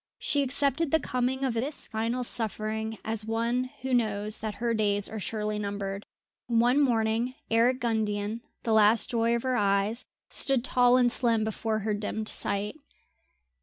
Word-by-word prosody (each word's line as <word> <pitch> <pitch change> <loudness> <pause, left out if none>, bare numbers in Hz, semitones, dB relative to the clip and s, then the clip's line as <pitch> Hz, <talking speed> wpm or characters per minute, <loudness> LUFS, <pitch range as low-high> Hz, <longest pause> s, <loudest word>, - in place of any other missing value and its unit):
She 285 - +1
accepted 280 +3 +1
the 320 - +3
coming 255 0 -1
of 260 -3 0
this 265 +6 -3
final 230 +3 -2
suffering 220 -1 -1
as 220 -1 -2
one 230 +3 0 0.2
who 265 0 -2
knows 215 -3 +1
that 215 -1 -4
her 235 0 -1
days 205 -2 +1
are 220 - -6
surely 210 0 -3
numbered. 200 -1 -4 0.4
One 240 +3 +3
morning 230 -1 +1 0.2
Eric 245 +3 +3
Gundian, 220 -1 -1 0.2
the 225 - 0
last 220 +1 +4
joy 230 0 +2
of 235 - -3
her 260 -1 0
eyes, 205 +4 +1 0.2
stood 270 -3 +2
tall 250 -1 +4
and 245 -1 +3
slim 230 -3 +2
before 220 0 -2
her 215 - +1
dimmed 215 +1 -2
sight. 205 +7 -1
225 Hz, 160 wpm, -28 LUFS, 215-245 Hz, 0.4 s, last